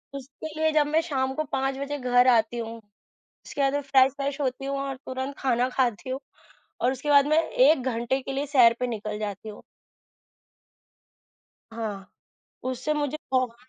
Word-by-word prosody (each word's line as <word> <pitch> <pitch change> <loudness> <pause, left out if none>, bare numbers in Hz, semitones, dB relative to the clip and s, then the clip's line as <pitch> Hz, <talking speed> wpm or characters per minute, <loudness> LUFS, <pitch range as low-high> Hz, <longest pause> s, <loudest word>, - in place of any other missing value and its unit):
उसके 275 +3 -8
लिए 315 0 +3
जब 300 -1 +3
मैं 310 +2 +2
शाम 265 -5 -1
को 310 - -1
5 270 0 0
बजे 280 +1 -3
घर 250 -1 +3
आती 235 -1 +3
हूँ, 230 0 -5 0.7
उसके 285 - -6
बाद 275 0 +2
मैं 285 - 0
फ्रेश-वेश 275 +1 +2
होती 265 -1 -2
हूँ 275 0 -2
और 275 -1 -3
तुरंत 260 +2 -4
खाना 250 -1 +1
खाती 250 -1 -1
हूँ, 265 - -3 0.6
और 250 - +2
उसके 275 +3 -4
बाद 280 -1 +6
मैं 310 +2 +3
1 - - +4
घंटे 245 +1 -1
के 270 - -5
लिए 275 +2 -2
सैर 250 -5 +5
पे 250 - +1
निकल 215 -2 -4
जाती 210 0 -5
हूँ। 210 - -10 2.1
हाँ, 210 -4 -5 0.6
उससे 255 +4 -2
मुझे 295 0 -2
बहुत 255 -3 +1
265 Hz, 170 wpm, -26 LUFS, 240-280 Hz, 2.1 s, बाद